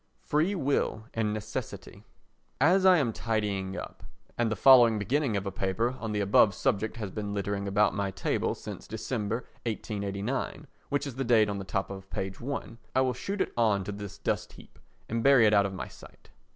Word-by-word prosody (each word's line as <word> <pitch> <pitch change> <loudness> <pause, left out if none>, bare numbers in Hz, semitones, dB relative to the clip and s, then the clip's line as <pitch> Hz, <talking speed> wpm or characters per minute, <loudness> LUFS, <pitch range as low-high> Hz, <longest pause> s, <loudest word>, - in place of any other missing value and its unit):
Free 160 +7 +1
Will 140 - 0
and 110 -2 0
Necessity 105 0 -6 0.6
As 185 +7 +5
I 185 -1 +7
am 125 -7 +1
tidying 100 -4 -2
up, - - -8 0.3
and 120 -2 0
the - - 0
following 120 -4 +7
beginning 120 +2 0
of 100 - -3
a 100 - -2
paper 95 +6 0
on 110 -2 -4
the 105 -1 0
above 100 0 +4
subject 110 +5 0
has 105 -4 -5
been 105 -1 -4
littering 100 0 -2
about 100 +1 +3
my 100 -1 -1
table 95 - -1
since - - -8
December 110 +3 -3 0.2
1889, 105 +6 -3 0.2
which 145 0 0
is 135 -3 -6
the 135 - 0
date 115 -4 +4
on 100 -1 -3
the - - -5
top 95 +1 -2
of 95 0 -9
page 95 0 -4
i, 120 -3 -5 0.2
I 130 - +4
will 130 -1 +1
shoot 195 - -3
it - - -1
on 110 -4 +2
to 105 - -5
this 100 -1 -7
dust - - -2
heap - - -16 0.3
and 115 +1 -1
bury 135 -2 +6
it 105 - +4
out 100 -1 +5
of 95 - -7
my - - -5
sight. - - -16
110 Hz, 200 wpm, -29 LUFS, 100-125 Hz, 0.6 s, I